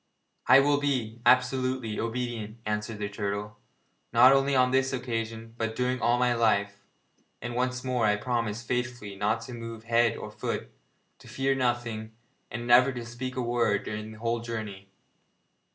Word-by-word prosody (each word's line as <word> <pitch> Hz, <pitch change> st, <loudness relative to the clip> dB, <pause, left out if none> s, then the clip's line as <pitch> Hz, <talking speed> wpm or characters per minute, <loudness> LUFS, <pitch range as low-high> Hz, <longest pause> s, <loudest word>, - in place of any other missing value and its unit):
'I 130 Hz, +2 st, +8 dB
will 145 Hz, +1 st, +3 dB
be 120 Hz, -6 st, -1 dB
absolutely 130 Hz, -2 st, +2 dB
obedient,' 115 Hz, -2 st, -3 dB
answered 105 Hz, +1 st, -2 dB
the 105 Hz, -1 st, -3 dB
turtle, 105 Hz, 0 st, -4 dB, 0.5 s
'not 130 Hz, -, +7 dB
only 135 Hz, 0 st, +2 dB
on 125 Hz, 0 st, +4 dB
this 135 Hz, 0 st, +2 dB
occasion 115 Hz, -3 st, -4 dB
but 115 Hz, -1 st, -2 dB
during 125 Hz, 0 st, -1 dB
all 120 Hz, +1 st, +3 dB
my 125 Hz, 0 st, +2 dB
life; 100 Hz, -4 st, +1 dB, 0.6 s
and 120 Hz, -, -5 dB
once 125 Hz, +1 st, -1 dB
more 125 Hz, -2 st, 0 dB
I 105 Hz, -, +3 dB
promise 115 Hz, 0 st, -2 dB
faithfully 120 Hz, -4 st, -3 dB
not 105 Hz, +3 st, 0 dB
to 130 Hz, -, -8 dB
move 115 Hz, -1 st, -7 dB
head 115 Hz, 0 st, +2 dB
or -, -, -7 dB
foot, -, -, -4 dB, 0.5 s
to -, -, -16 dB
fear 135 Hz, 0 st, 0 dB
nothing, 120 Hz, -4 st, -2 dB, 0.4 s
and 120 Hz, 0 st, -5 dB
never 125 Hz, +3 st, +6 dB
to 120 Hz, -2 st, -6 dB
speak 125 Hz, +2 st, -6 dB
a 130 Hz, -, -1 dB
word 120 Hz, -3 st, +1 dB
during 105 Hz, 0 st, -5 dB
the -, -, -12 dB
whole 115 Hz, +1 st, -1 dB
journey.' 110 Hz, -4 st, -6 dB
120 Hz, 165 wpm, -28 LUFS, 110-125 Hz, 0.6 s, I